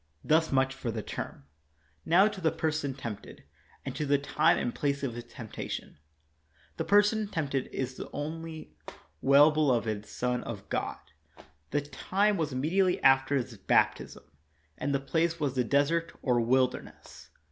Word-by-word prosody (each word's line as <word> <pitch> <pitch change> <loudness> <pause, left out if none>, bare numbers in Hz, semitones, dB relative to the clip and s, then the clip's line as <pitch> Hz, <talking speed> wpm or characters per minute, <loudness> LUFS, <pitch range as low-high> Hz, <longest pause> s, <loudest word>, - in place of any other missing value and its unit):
Thus 160 +1 +2
much 135 -1 +2
for 135 -2 -5
the 110 -2 -3
term. 70 - -6 0.6
Now 185 +5 +6
to 205 -3 -5
the 160 - +2
person 155 -4 -2
tempted, 115 -7 -8 0.4
and - - -5
to - - -2
the 145 +1 +4
time 140 - +2
and 120 - -2
place 140 -1 -1
of 130 -4 -2
his 120 0 -7
temptation. 115 -9 -7 0.8
The - - -2
person 210 +1 +3
tempt 155 -8 -3
ed 135 -2 0
is 130 -1 -3
the - - -8
only 160 +2 -6 0.5
well 140 +3 +6
beloved 115 -8 0
Son 125 +2 -2
of 105 -4 -7
God; - - -2 0.7
the 145 - 0
time 200 +8 0
was 160 -5 -1
immediately 180 +8 +1
after 135 +1 +5
his 125 -3 -2
baptism; - - +1 0.5
and 140 - -2
the 140 - +1
place 165 +4 0
was 145 -4 0
the 130 -2 +1
desert 145 +6 +1
or 125 -3 +2
wilderness. 130 +2 -1
140 Hz, 160 wpm, -29 LUFS, 130-160 Hz, 0.8 s, Now